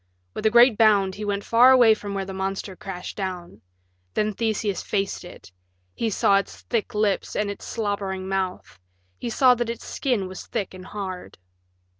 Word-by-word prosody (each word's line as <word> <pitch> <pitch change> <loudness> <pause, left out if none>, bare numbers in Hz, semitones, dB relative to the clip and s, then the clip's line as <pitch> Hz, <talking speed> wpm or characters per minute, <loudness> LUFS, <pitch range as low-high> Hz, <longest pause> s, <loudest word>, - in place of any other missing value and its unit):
With 220 - 0
a - - +5
great 235 0 +6
bound 205 -4 +4
he 210 - -7
went 200 0 -2
far 240 +3 +6
away 245 -4 +7
from 205 -2 -6
where 195 -1 -2
the 195 - -7
monster 190 0 -4
crashed 180 -1 -7
down. 180 - -5 0.5
Then 215 0 +1
Theseus 215 -3 -1
faced 195 -2 -2
it: 175 - -13 0.4
he 225 - -1
saw 200 -1 +3
its 200 - -4
thick 230 0 -2
lips 210 -2 0
and 210 -1 0
its 200 - -9
slobbering 200 -4 -3
mouth; 190 - -3 0.4
he - - -3
saw 250 +2 +5
that 240 -1 -2
its 230 0 -5
skin 240 -9 -1
was 185 0 -9
thick 195 - -3
and 185 0 -10
hard. 190 -3 -6
200 Hz, 180 wpm, -24 LUFS, 190-220 Hz, 0.5 s, away